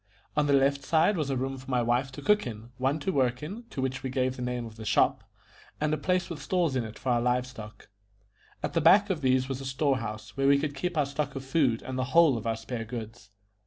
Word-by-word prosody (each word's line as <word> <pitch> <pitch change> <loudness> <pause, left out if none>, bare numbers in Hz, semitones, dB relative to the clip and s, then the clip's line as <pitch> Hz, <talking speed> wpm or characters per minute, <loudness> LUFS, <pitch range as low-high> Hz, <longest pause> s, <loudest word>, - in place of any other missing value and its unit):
On 150 -1 +2
the 140 - +3
left 140 +1 +3
side 160 +8 +3
was 155 -5 -1
a 135 - 0
room 135 +1 -3
for 130 +2 -12
my 125 -2 +1
wife 120 +3 +1
to 145 - -8
cook 210 -2 +3
in, 115 +1 -8
one 135 +3 +1
to 190 - 0
work 125 -2 +1
in, 205 +10 -7
to 130 - -4
which 130 0 -2
we 130 - -3
gave 130 0 0
the 125 - -7
name 125 -1 -2
of 110 -1 -10
the 110 - -9
shop, 105 -1 +2 0.6
and 155 0 0
a - - +1
place 180 0 0
with 165 -5 -7
stalls 170 -4 0
in 125 - +1
it 110 -1 -8
for 130 - -4
our 120 -1 +2
live 125 +1 +1
stock. 110 -4 -11 0.8
At - - -2
the 165 - +2
back 200 +6 +6
of 170 -5 -2
these 130 -1 +2
was 135 -1 -4
a - - -7
store 135 +1 +1
house, 110 -1 -7
where 135 0 +1
we 140 0 +6
could 145 0 -2
keep 170 +5 -3
our 150 - +3
stock 140 +2 -3
of 135 0 -5
food 130 -5 +1
and 130 0 -4
the 130 - 0
whole 165 -6 +7
of 115 0 -4
our 115 0 0
spare 115 +1 -5
goods. 110 -2 -8
130 Hz, 270 wpm, -28 LUFS, 125-150 Hz, 0.8 s, whole